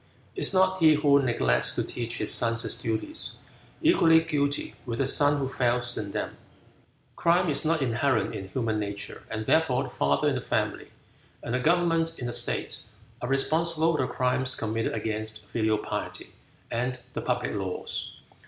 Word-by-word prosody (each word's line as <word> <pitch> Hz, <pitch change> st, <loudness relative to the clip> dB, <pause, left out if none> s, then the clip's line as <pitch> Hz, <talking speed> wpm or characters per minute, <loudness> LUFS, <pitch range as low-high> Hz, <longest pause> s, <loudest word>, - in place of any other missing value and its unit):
Is -, -, +1 dB
not 190 Hz, 0 st, +3 dB
he 160 Hz, -2 st, +6 dB
who 145 Hz, -1 st, +4 dB
neglects 90 Hz, -, +2 dB
to -, -, 0 dB
teach 120 Hz, -1 st, -4 dB
his -, -, +2 dB
son 115 Hz, -1 st, +4 dB
his 115 Hz, -, -1 dB
duties, 115 Hz, -, -4 dB, 0.5 s
equally 165 Hz, -, +5 dB
guilty 145 Hz, -3 st, -1 dB
with 115 Hz, -2 st, -4 dB
the 135 Hz, -, +1 dB
son 145 Hz, +2 st, +4 dB
who 135 Hz, -2 st, -1 dB
fails 120 Hz, -2 st, 0 dB
in 100 Hz, -2 st, -4 dB
them? -, -, -4 dB, 0.8 s
Crime 175 Hz, 0 st, +2 dB
is 140 Hz, -, 0 dB
not 160 Hz, -2 st, +1 dB
inherent 120 Hz, 0 st, 0 dB
in 95 Hz, -, -6 dB
human 110 Hz, +1 st, -2 dB
nature, 100 Hz, -1 st, -5 dB
and 110 Hz, 0 st, -4 dB
therefore 150 Hz, -2 st, +2 dB
the -, -, -8 dB
father 70 Hz, 0 st, +1 dB
in -, -, +2 dB
the -, -, -2 dB
family, -, -, -2 dB, 0.6 s
and 120 Hz, -, -4 dB
the 125 Hz, -, +1 dB
government 165 Hz, +1 st, +1 dB
in 125 Hz, -, -5 dB
the 120 Hz, -, -2 dB
state, -, -, 0 dB, 0.4 s
are 125 Hz, -, -3 dB
responsible 160 Hz, +4 st, +3 dB
for -, -, 0 dB
the -, -, -8 dB
crimes 130 Hz, 0 st, +1 dB
committed 115 Hz, +1 st, -2 dB
against 110 Hz, -1 st, -3 dB
filial 110 Hz, +1 st, 0 dB
piety -, -, -5 dB, 0.4 s
and 125 Hz, +2 st, -1 dB, 0.2 s
the -, -, -3 dB
public 125 Hz, -1 st, -1 dB
laws. 95 Hz, -3 st, -4 dB
125 Hz, 170 wpm, -27 LUFS, 110-160 Hz, 0.8 s, he